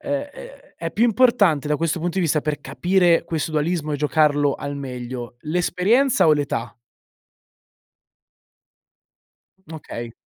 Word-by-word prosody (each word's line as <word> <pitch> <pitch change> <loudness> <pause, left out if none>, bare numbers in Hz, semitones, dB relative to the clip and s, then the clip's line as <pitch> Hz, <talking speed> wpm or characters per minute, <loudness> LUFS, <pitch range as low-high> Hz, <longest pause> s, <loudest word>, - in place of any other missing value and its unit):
ehm, 285 0 -2
è - - -13
è - - -4
più 230 - +2
importante, 215 - +3
da 150 - +1
questo 165 +1 -1
punto 175 +2 -3
di - - +2
vista, 155 -2 +1
per 150 -1 -3
capire 175 +5 +2
questo 160 -1 -3
dualismo 155 0 -1
e - - 0
giocarlo 145 -1 +2
al 145 0 -5
meglio, 125 -3 -7
l'esperienza 180 - +2
o 155 - +6
l'età? 135 -5 -2 3.0
Okay. 120 -7 -7
155 Hz, 130 wpm, -22 LUFS, 145-185 Hz, 3.0 s, o